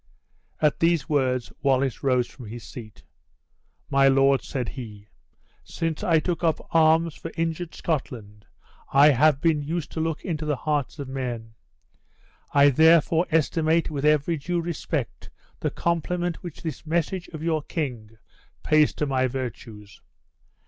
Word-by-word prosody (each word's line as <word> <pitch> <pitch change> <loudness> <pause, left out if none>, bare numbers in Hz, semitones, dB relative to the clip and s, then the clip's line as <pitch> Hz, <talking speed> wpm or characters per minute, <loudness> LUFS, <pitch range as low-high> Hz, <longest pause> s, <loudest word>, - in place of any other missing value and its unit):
At 150 -1 +2
these 165 -3 +2
words 130 -5 0
Wallace 135 -3 +1
rose 125 -3 +2
from 125 -2 -12
his 115 +2 -8
seat. 110 -4 -11 0.9
"My 135 0 +5
lord," 135 0 +4
said 125 -4 -4
he, 105 -5 -9 0.5
"since 165 +2 -4
I 170 -5 +3
took 170 +1 -3
up 160 -2 +2
arms 160 0 +4
for 165 - -8
injured 165 +1 -2
Scotland, 110 -10 -4 0.4
I 145 +2 +7
have 145 +2 +4
been 160 -3 +2
used 160 +2 -4
to - - -5
look 160 -1 -2
into 160 -4 -3
the 150 -1 0
hearts 145 +1 -2
of 140 -3 -6
men; 120 -4 -5 1.0
I 140 0 +6
therefore 160 +3 +4
estimate 160 0 +1
with 145 -2 -4
every 150 +2 +2
due 175 +5 -2
respect 165 -6 -4 0.3
the - - -1
compliment 170 +1 -1
which 175 -4 -9
this 160 -3 -5
message 170 +3 -1
of 155 -2 -8
your 160 -2 0
king 120 -9 -5 0.5
pays 155 -1 +3
to 150 - -1
my 130 -2 +1
virtues. 115 -5 -7
150 Hz, 145 wpm, -25 LUFS, 130-165 Hz, 1.0 s, I